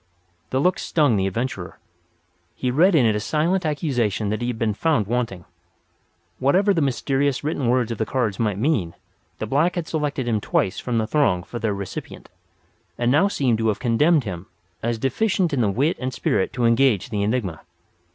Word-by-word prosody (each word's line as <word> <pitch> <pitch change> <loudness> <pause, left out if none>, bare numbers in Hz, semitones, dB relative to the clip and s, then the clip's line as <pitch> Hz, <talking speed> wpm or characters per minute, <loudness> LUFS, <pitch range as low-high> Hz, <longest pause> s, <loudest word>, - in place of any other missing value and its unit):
The 130 - 0
look 180 +6 +2
stung 145 -8 +2
the 95 -1 +1
adventurer. 100 -3 -4 0.8
He 125 - -1
read 170 +8 +4
in 135 -6 +5
it 110 -2 +3
a - - 0
silent 160 - 0
accusation 125 - -1
that 110 +2 -2
he 120 - -1
had 120 -2 -3
been 110 -2 0
found 135 -2 +1
wanting. 110 -5 -2 0.9
Whatever 190 +10 +3
the 165 - +1
mysterious 135 0 0
written 145 -4 -1
words 120 -2 +1
on 115 - -5
the 110 - +1
cards 115 -7 -1
might 105 -4 0
mean, 105 - 0 0.4
the - - -3
black 150 - +1
had 170 -2 -3
selected 145 -5 -2
him 110 -3 0
twice 95 -1 0
from 120 -2 -2
the 110 - +1
throng 110 -9 +1
for 120 - -7
their 110 -3 -1
recipient; 100 -2 -7 0.7
and 120 0 +1
now 150 +8 +4
seemed 130 - 0
to 110 - +1
have 105 - +1
condemned 140 +6 +3
him 95 -4 -6 0.3
as 115 0 -1
deficient 175 - 0
in 130 - +1
the 105 - +2
wit 135 - +1
and 130 -1 -3
spirit 95 - 0
to 125 -2 0
engage 115 -2 +2
the 105 -2 -1
enigma. 100 -6 -1
125 Hz, 190 wpm, -22 LUFS, 110-145 Hz, 0.9 s, in